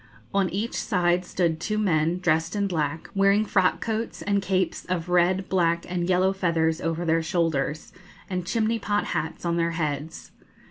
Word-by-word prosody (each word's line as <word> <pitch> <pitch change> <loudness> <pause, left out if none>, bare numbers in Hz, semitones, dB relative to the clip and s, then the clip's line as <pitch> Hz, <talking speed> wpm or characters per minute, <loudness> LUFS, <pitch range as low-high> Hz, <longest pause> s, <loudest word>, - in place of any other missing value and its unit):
On 195 -2 +2
each 210 +5 -3
side 180 -3 +1
stood 170 -3 0
two 215 +5 -2
men, 170 -4 +1
dressed 165 0 +1
in 200 -1 +1
black, 160 -4 -2
wearing 200 +2 +3
frock 190 -3 +2
coats, 225 0 -3
and 200 -1 +1
capes 190 0 -1
of 180 -1 -3
red, 180 +2 +2
black, 170 -2 +1
and 175 0 -2
yellow 185 +1 +3
feathers 165 -4 0
over 165 +1 -2
their 165 0 +2
shoulders, 160 -2 -1 0.3
and 180 -2 -3
chimney 225 +1 +1
pot 205 0 0
hats 160 0 -3
on 170 0 0
their 170 0 0
heads. 150 -1 -4
180 Hz, 170 wpm, -25 LUFS, 165-195 Hz, 0.3 s, wearing